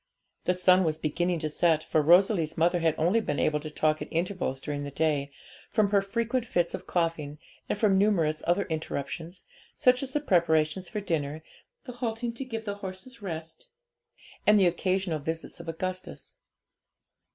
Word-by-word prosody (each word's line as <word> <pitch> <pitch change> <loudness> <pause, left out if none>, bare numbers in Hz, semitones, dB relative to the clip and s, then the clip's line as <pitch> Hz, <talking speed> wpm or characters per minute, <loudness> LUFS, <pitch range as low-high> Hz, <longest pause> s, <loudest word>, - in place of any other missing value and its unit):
The 180 - +2
sun 185 +1 +5
was 155 -2 0
beginning 170 +3 0
to 155 - -1
set, 160 0 +2
for 155 - +1
Rosalie's 175 +1 +4
mother 175 +2 +3
had 165 -2 +2
only 180 +8 +2
been 145 -9 -2
able 150 -1 +1
to 155 +1 -7
talk 155 0 +1
at - - -4
intervals 170 -5 -1
during 145 +1 -4
the 145 - -4
day, 145 -1 0 0.4
from 210 -2 +2
her 200 -1 +4
frequent 230 +5 -1
fits 175 -7 0
of - - -6
coughing, 165 -4 -1 0.3
and - - 0
from 200 -3 +3
numerous 165 -7 +2
other 175 +4 +2
interruptions, 160 +2 -5 0.3
such 250 0 +4
as 270 -1 -4
the 295 - +2
preparations 170 - +2
for 210 - -3
dinner, 155 -4 -2 0.4
the 250 - -7
halting 235 -1 -3
to 260 +3 -6
give 225 -3 -5
the 200 -1 -3
horses 200 +6 -9
rest, 165 - -6 0.8
and 210 0 +7
the 190 - +5
occasional 180 -1 0
visits 160 +4 -5
of 170 -1 -7
Augustus. 185 +3 -5
175 Hz, 175 wpm, -28 LUFS, 155-200 Hz, 0.8 s, and